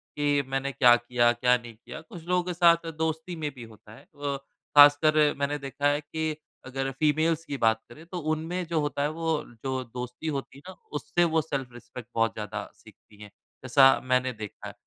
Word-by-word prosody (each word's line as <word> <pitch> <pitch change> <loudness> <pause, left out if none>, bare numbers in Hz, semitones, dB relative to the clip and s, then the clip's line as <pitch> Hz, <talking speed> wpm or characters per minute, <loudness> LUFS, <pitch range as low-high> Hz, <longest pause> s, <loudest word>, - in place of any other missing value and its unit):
कि 150 - -5
ये 140 - +2
मैंने 135 +1 -1
क्या 120 -3 +6
किया? 120 0 +2
क्या 125 +1 +3
नहीं 120 -1 -11
किया? 120 +2 -10
कुछ 165 +1 -12
लोगों 180 0 +2
के 180 0 -3
साथ 170 -1 +4
दोस्ती 160 +2 -2
में 155 -2 -3
भी 125 - -9
होता 105 0 -17
है। - - -16
अ, 145 -1 -5 0.4
खासकर 145 +1 +8 0.2
मैंने 140 +1 -1
देखा 140 +1 -2
है 145 +1 +2
कि 155 +1 -3 0.3
अगर 135 +1 -3
फ़ीमेल्स 155 +1 +2
की 140 - -4
बात 110 -2 +3
करें, 155 +7 -13
तो 175 +1 -6
उनमें 165 +3 -2
जो 165 -1 0
होता 145 -1 -2
है 145 - +1
वो 160 -1 -1 0.2
जो 130 -1 -1
दोस्ती 125 +4 -7
होती 135 - -8
है - - -14
ना 190 - -10 0.3
उससे 175 - +1
वो 160 - +4
सेल्फ 135 -5 -4
रिस्पेक्ट 120 0 -11
बहुत 115 0 +2
ज़्यादा 105 -1 -6
सीखती 105 -1 -19
हैं, 105 -1 -11 0.3
जैसा 135 +1 +6
मैंने 130 0 +1
देखा 110 -2 -8
है। - - -8
140 Hz, 205 wpm, -27 LUFS, 125-160 Hz, 0.4 s, खासकर